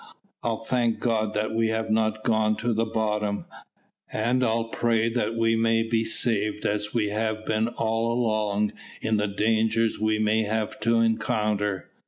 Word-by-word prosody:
I'll 115 -1 -2
thank 120 -1 0
God 110 -3 0
that 110 +1 -1
we 115 0 +2
have 110 0 -1
not 110 0 +1
gone 110 -1 +2
to 120 +2 0
the 115 +1 0
bottom, 105 -2 -1 0.7
and 120 +4 +1
I'll 115 -1 0
pray 115 -1 +1
that 115 -1 -1
we 115 0 +2
may 115 0 +2
be 115 0 0
saved 110 -2 0
as 105 0 -1
we 110 -4 0
have 110 +1 -2
been 110 +1 +1
all 115 0 -1
along 110 -3 0 0.3
in 110 -1 +1
the 105 0 0
dangers 110 +2 +1
we 110 0 +1
may 110 +1 +2
have 110 0 -2
to 115 +1 +2
encounter." 105 -3 0
110 Hz, 165 wpm, -25 LUFS, 110-115 Hz, 0.7 s, we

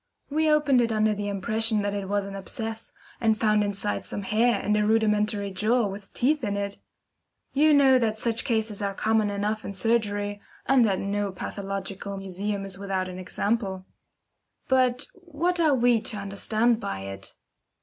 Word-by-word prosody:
We 310 +1 +2
opened 295 -4 +4
it 230 -1 +1
under 215 0 +2
the 205 0 -4
impression 215 +2 0
that 205 0 -1
it 200 -2 -4
was 205 0 0
an 200 0 -7
abscess, 225 +3 -6 0.3
and 220 -1 +2
found 215 -1 +3
inside 195 - -2
some 205 - -5
hair 220 +2 +2
and 210 - 0
a 210 - +2
rudimentary 210 -2 +1
jaw 220 +5 +1
with 200 0 -7
teeth 290 +3 +1
in 205 -2 -1
it. 200 0 -4 0.7
You 305 +3 +4
know 270 -3 +6
that 220 -2 0
such 230 +1 0
cases 220 -3 -1
are 200 -1 -2
common 220 0 +2
enough 205 +2 -2
in 200 - -5
surgery, 205 -1 0 0.2
and 270 -2 +5
that 195 -3 +1
no 200 +1 -2
pathological 195 +1 -5
museum 195 +1 -3
is 195 -1 -4
without 190 -2 -2
an 185 0 -7
example. 190 0 -2 0.8
But 255 -1 +2
what 350 0 -2
are 310 -4 +4
we 240 -2 +3
to 215 -1 -3
understand 215 +4 +1
by 95 - -4
it? 95 0 -8
210 Hz, 170 wpm, -26 LUFS, 200-235 Hz, 0.8 s, know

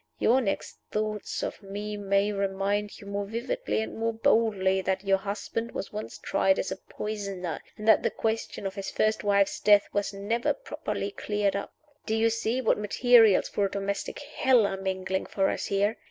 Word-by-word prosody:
Your 255 +3 +4
next 195 -5 -3
thoughts 215 -1 -2
of - - -4
me 205 +1 -5
may 200 0 +1
remind 200 +1 -1
you - - -12
more 200 0 -3
vividly 235 - -2
and - - -7
more 230 0 -1
boldly 205 -4 +2
that 190 +1 -1
your 195 -1 +3
husband 210 +4 -4
was - - -5
once 210 +1 -6
tried 195 0 +2
as - - -2
a - - -1
poisoner, 200 -5 -5 0.2
and 215 - -6
that 220 - +7
the - - +1
question 225 -2 -3
of 195 - -2
his 195 0 -5
first 215 0 +1
wife's 200 -1 +2
death 205 -1 +5
was 205 -1 0
never 205 +4 -1
properly - - -4
cleared 205 - -1
up. 200 - -4 0.4
Do 220 - +1
you 225 +1 +3
see 230 +2 -1
what 250 - +2
materials 225 0 +5
for 205 - 0
a - - -1
domestic 200 0 -3
hell 260 -5 +3
are 200 - -1
mingling 190 0 -2
for 195 -1 +1
us - - -3
here? 205 +2 +1
205 Hz, 185 wpm, -28 LUFS, 195-220 Hz, 0.4 s, that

